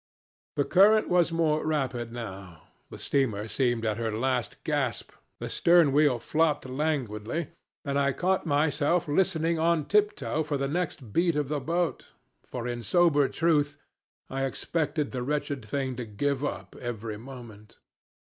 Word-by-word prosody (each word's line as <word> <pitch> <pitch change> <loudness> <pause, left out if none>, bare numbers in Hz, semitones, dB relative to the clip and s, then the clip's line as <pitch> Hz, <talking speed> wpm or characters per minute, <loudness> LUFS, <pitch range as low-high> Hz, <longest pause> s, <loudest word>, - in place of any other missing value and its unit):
"The 145 - +1
current 210 +3 +5
was 175 -1 +3
more 160 -2 +1
rapid 130 -6 -1
now, 95 -8 -8 0.3
the - - -9
steamer 115 -7 0
seemed 120 0 0
at 110 -1 0
her 115 -1 -1
last 125 0 -2
gasp, - - -1 0.3
the - - -4
stern 170 -4 +4
wheel 145 -3 +4
flopped 155 +4 0
languidly, 135 -1 -2 0.4
and 140 0 0
I 140 0 +2
caught 185 +6 0
myself 150 +3 +2
listening 165 0 +1
on 165 -2 +2
tiptoe 205 -6 +1
for 150 -2 -1
the 140 0 -1
next 145 - -3
beat 170 -1 +2
of 145 -2 -1
the 150 -1 -1
boat, 165 +4 -1 0.4
for 120 -1 -5
in 120 -1 -3
sober 145 -1 +3
truth 145 -4 +1 0.5
I 135 0 -2
expected 150 +1 -2
the 125 - -3
wretched 145 -1 -2
thing 130 +3 -2
to 125 - -4
give 135 +6 -1
up 145 - -4
every 115 -3 -4
moment. 115 -3 -12
145 Hz, 150 wpm, -28 LUFS, 120-160 Hz, 0.5 s, current